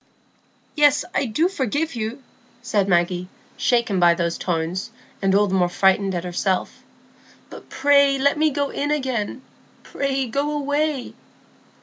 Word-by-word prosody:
"Yes, 290 -1 +4
I - - +1
do 270 +10 +1
forgive 305 - -2
you," 230 +4 -5 0.4
said 205 -5 0
Maggie, 175 0 +1 0.3
shaken 235 -6 +1
by 170 -1 +5
those 170 0 -2
tones, 175 +5 -2 0.3
and 195 -1 +2
all 205 +1 +4
the 190 - -3
more 180 -2 +2
frightened 190 +1 +2
at 170 - -3
herself. 180 +1 -2 0.7
"But - - -12
pray 280 0 +3
let 280 +2 +2
me 310 +1 +2
go 285 -1 -2
in 290 - -2
again. 260 -4 -2 0.4
Pray 275 -1 -2
go 280 +5 -2
away." 285 -1 -1
240 Hz, 140 wpm, -22 LUFS, 190-285 Hz, 0.7 s, by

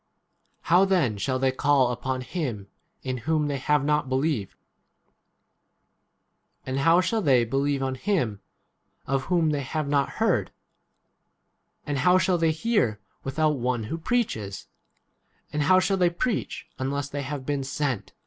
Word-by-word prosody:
How 175 +3 +4
then 170 - +1
shall 130 +5 0
they 130 0 +2
call 135 -1 +2
upon 130 +1 -3
him 125 - -4 0.4
in 130 -1 -2
whom 150 +4 0
they 140 -2 -2
have 145 +1 +1
not 150 -2 +1
believed? 130 -6 -1 2.1
and 130 +1 -2
how 165 +5 +5
shall 215 +5 0
they 130 - +4
believe 135 +3 0
on 130 0 -1
him 130 - -1 0.6
of 135 0 -1
whom 170 -3 +2
they 145 -1 -1
have 150 +3 -3
not 140 -1 +1
heard? - - +1 1.4
and 145 -2 -2
how 180 +6 +5
shall 185 -1 +2
they 165 -1 +3
hear 160 - 0 0.2
without 150 +1 0
one 120 -1 -1
who 115 +10 -4
15 165 - -15
preaches? 110 - -2 0.9
and 150 - 0
how 185 +6 +5
shall 195 +1 +1
they 180 -2 +3
preach 205 +7 -2
unless 140 +2 -2
they 145 0 -4
have 140 -1 -5
been 145 -1 -1
sent 135 -4 -2
140 Hz, 150 wpm, -26 LUFS, 130-165 Hz, 2.1 s, how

